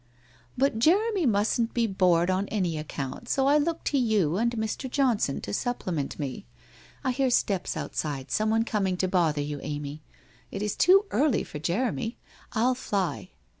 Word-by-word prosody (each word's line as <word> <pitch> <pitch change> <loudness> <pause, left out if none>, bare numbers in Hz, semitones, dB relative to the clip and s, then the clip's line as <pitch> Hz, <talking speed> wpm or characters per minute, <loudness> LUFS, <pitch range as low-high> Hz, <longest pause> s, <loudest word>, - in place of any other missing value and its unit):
' 120 +1 -31
But 265 -4 +1
Jeremy 380 - +3
mustn't 225 +2 +1
be 235 -1 +2
bored 185 -3 +3
on 190 +2 0
any 185 -6 -1
account, 155 - -5
so 270 - +2
I 290 +2 +5
look 330 +2 -1
to 280 - +1
you 210 -10 +2
and 230 +4 +2
Mr. 220 +4 -3
Johnson 245 - +1
to 100 - -5
supplement 175 - -2
me. 135 - -5 0.6
I 260 - +1
hear 265 +1 +1
steps 200 -6 0
outside, 140 -4 -4
someone 220 +1 +2
coming 195 -5 0
to 185 - 0
bother 165 -5 +1
you, 145 0 -4
Amy! 145 0 -5 0.5
It 195 - -4
is 210 - -1
too 390 +3 +5
early 290 -4 +2
for 150 - -8
Jeremy! 225 - -1 0.3
I'll 240 +4 +2
fly 200 -7 -2
210 Hz, 170 wpm, -27 LUFS, 165-250 Hz, 0.6 s, I